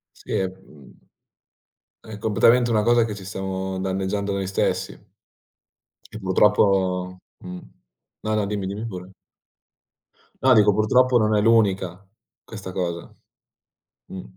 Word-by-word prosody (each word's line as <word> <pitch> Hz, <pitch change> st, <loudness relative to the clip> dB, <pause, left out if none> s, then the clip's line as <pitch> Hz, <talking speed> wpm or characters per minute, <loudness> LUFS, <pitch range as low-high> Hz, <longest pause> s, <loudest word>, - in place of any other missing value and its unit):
Sì, -, -, -10 dB
è 95 Hz, -, +1 dB
uhm, 95 Hz, -6 st, -11 dB, 1.1 s
è 110 Hz, -2 st, -10 dB
completamente 115 Hz, +3 st, +3 dB
una 110 Hz, -2 st, +2 dB
cosa 120 Hz, +1 st, +4 dB
che 105 Hz, -2 st, -5 dB
ci 100 Hz, -2 st, -10 dB
stiamo 95 Hz, 0 st, -4 dB
danneggiando 95 Hz, +1 st, -2 dB
noi 100 Hz, -1 st, -2 dB
stessi. 95 Hz, -, -2 dB, 1.0 s
E 110 Hz, -, -7 dB
purtroppo 95 Hz, -2 st, +2 dB, 0.3 s
mh. 90 Hz, 0 st, -7 dB, 0.6 s
No, 110 Hz, 0 st, -1 dB
no, 105 Hz, -2 st, 0 dB
dimmi, 100 Hz, -1 st, -3 dB
dimmi 100 Hz, +3 st, -5 dB
pure. 90 Hz, -3 st, -8 dB, 1.3 s
No, 130 Hz, -1 st, +6 dB
dico 105 Hz, -2 st, +5 dB
purtroppo 125 Hz, +5 st, +3 dB
non 110 Hz, -1 st, +2 dB
è -, -, +3 dB
l'unica, 100 Hz, -5 st, +2 dB, 0.4 s
questa 100 Hz, -4 st, -8 dB
cosa. 85 Hz, -2 st, -4 dB, 0.9 s
Mh. 95 Hz, -, -8 dB
100 Hz, 125 wpm, -23 LUFS, 95-110 Hz, 1.3 s, No